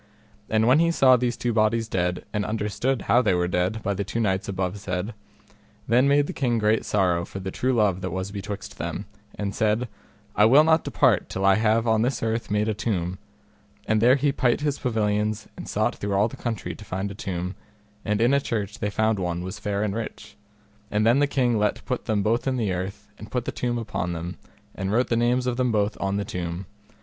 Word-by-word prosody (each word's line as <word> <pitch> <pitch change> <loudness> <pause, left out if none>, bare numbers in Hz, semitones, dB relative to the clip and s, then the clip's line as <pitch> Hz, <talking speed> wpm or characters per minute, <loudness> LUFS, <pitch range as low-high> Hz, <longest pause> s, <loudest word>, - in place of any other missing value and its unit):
And 110 0 +2
when 130 +5 +5
he 170 0 +4
saw 135 -6 +5
these 120 -1 -1
two 120 -1 -1
bodies 110 +1 +2
dead, 90 -3 -1
and 105 - 0
understood 110 +4 -1
how 120 - +4
they 105 -7 +2
were 90 0 +1
dead, 90 +5 -1
by 100 - 0
the 100 +1 -2
two 100 +4 -3
knights 100 -2 0
above 95 +1 -2
said, 100 +2 -3 0.7
then 125 +4 +4
made 145 +1 +4
the - - -5
king 120 -4 0
great 110 0 +2
sorrow 90 -4 +1
for 95 - -7
the 95 0 -5
true 130 +6 0
love 105 -6 +2
that 95 - -3
was 95 +2 -4
betwixt 100 0 -6
them, - - -4 0.3
and 100 -1 -3
said, 110 +4 +1 0.5
I 105 - +5
will 135 +7 +7
not 160 0 +3
depart - - +2
till 95 - -2
I 95 - +6
have 110 +2 +2
on 110 -1 +3
this 125 0 0
earth 115 +1 -1
made 105 +1 +1
a 110 - +1
tomb, 95 -4 -2 0.7
and 110 0 +2
there 125 +3 +6
he 140 +1 +2
pight 125 -2 +1
his 145 -2 -1
pavilions 110 -3 0
and - - -8
sought - - 0
through 100 0 -3
all 100 +2 +3
the - - -9
country 115 -2 -4
to - - -11
find 95 0 -3
a - - -6
tomb, 90 -3 -4 0.5
and 105 0 0
in 120 +4 +4
a 140 - +3
church 105 -6 -3
they 105 - -1
found 110 0 +1
one 90 -1 -2
was 95 0 -6
fair 100 0 -1
and 105 -2 -1
rich, 110 -10 -6 0.5
and 105 +1 +1
then 120 +4 +5
the 145 - +3
king 125 -5 +1
let 105 - 0
put 125 -2 -3
them 105 -3 +1
both 115 +5 +1
in 130 -1 +1
the 105 -6 0
earth, 95 +3 -5
and 105 - -9
put 125 -2 -2
the - - -2
tomb 120 -1 -2
upon 90 -6 -3
them, 85 0 -5 0.4
and 95 0 -3
wrote 120 +4 +2
the 115 - +2
names 120 +2 +2
of 125 -1 -1
them 125 -2 +1
both 105 -1 +1
on 100 0 0
the 100 - -2
tomb. 85 +1 -4
105 Hz, 230 wpm, -25 LUFS, 95-120 Hz, 0.7 s, will